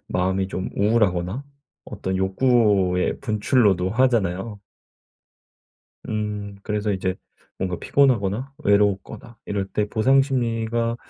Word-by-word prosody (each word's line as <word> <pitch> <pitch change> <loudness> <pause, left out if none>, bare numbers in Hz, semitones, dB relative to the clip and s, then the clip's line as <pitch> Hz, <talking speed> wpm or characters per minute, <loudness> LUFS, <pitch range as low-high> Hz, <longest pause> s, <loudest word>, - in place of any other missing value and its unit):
마음이 95 +1 0
좀 95 -1 -4
우울하거나 105 +1 +1 0.4
어떤 95 -2 -4
욕구의 95 -2 +2
분출로도 105 -5 +2
하잖아요. 105 -4 0 1.5
음. 105 -2 -4
그래서 105 0 -1
이제 95 -1 -1 0.4
뭔가 90 -2 -2
피곤하거나 130 -1 +1
외로웠거나 105 +3 0
이럴 100 -1 -2
때 105 -1 -1
보상심리가 115 -2 +1
105 Hz, 260 characters per minute, -23 LUFS, 95-115 Hz, 1.5 s, 욕구의